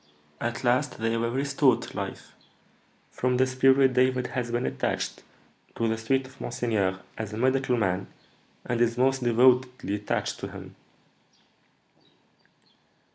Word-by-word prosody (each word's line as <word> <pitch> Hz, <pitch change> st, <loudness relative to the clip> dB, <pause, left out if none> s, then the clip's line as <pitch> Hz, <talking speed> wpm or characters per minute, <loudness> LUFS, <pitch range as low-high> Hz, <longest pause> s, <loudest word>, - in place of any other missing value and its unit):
At 120 Hz, +2 st, -3 dB
last 125 Hz, +1 st, +1 dB
they 115 Hz, +1 st, 0 dB
were 115 Hz, 0 st, 0 dB
restored 135 Hz, 0 st, +2 dB
to -, -, -10 dB
life. -, -, -6 dB, 0.8 s
From 125 Hz, 0 st, 0 dB
this 130 Hz, 0 st, +2 dB
period 135 Hz, 0 st, +4 dB
David 130 Hz, 0 st, +2 dB
has 125 Hz, -2 st, -2 dB
been 120 Hz, +2 st, -1 dB
attached -, -, -2 dB, 0.5 s
to 115 Hz, -, 0 dB
the 110 Hz, -, +1 dB
suite 130 Hz, +4 st, 0 dB
of 130 Hz, +1 st, -15 dB
monseigneur 105 Hz, -6 st, -1 dB, 0.2 s
as 110 Hz, -1 st, -4 dB
a -, -, -5 dB
medical 130 Hz, +1 st, +1 dB
man, 95 Hz, -3 st, 0 dB, 0.6 s
and 120 Hz, -1 st, -1 dB
is 115 Hz, 0 st, +2 dB
most 135 Hz, +1 st, +2 dB
devotedly 125 Hz, -1 st, +3 dB
attached 105 Hz, 0 st, -2 dB
to -, -, -5 dB
him." -, -, -10 dB
125 Hz, 135 wpm, -27 LUFS, 115-130 Hz, 0.8 s, period